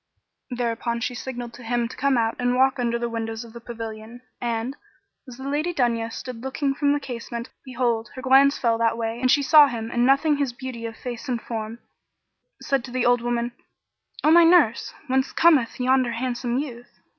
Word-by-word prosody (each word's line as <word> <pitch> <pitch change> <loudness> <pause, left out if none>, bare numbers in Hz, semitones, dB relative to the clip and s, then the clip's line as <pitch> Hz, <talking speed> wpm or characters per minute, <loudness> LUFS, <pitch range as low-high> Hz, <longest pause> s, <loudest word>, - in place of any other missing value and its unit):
Thereupon 235 -1 -2
she 245 - -2
signed 245 -1 -6
to - - -12
him 240 0 -1
to - - -10
come 275 -1 +1
out 225 -1 +1
and 245 0 +1
walk 265 +1 +3
under 235 -1 0
the 235 0 -2
windows 225 0 -4
of 230 -1 -13
the 235 - -10
pavilion, 225 0 -8 0.2
and, 240 +2 -2 0.5
as 245 -1 -10
the 265 +1 -7
Lady 305 +5 -1
Dunya 230 -3 0
stood 245 0 -7
looking 275 +2 -1
from 285 +1 +1
the 290 - +1
casement, 235 -2 -6
behold, 240 -4 -1
her 255 - -7
glance 275 +2 +5
fell 230 -2 +1
that 230 0 +1
way 230 +1 -3
and 255 - +2
she 285 +2 +4
saw 300 0 +7
him 230 -3 -5
and 240 - +1
noting 275 +3 +3
his 280 -4 -1
beauty 245 -2 -6
of 225 - -9
face 245 +3 -7
and 245 -2 0
form, 225 -1 -5 0.8
said 275 -3 0
to - - -10
the 250 0 -1
old 245 0 +4
woman, 240 0 -1 0.7
"O 310 - +5
my 340 +1 +8
nurse, 330 -9 +4
whence 265 +1 0
cometh 295 -10 +3
yonder 255 -1 +2
handsome 240 0 -2
youth?" 245 -4 -5
245 Hz, 200 wpm, -24 LUFS, 235-265 Hz, 0.8 s, my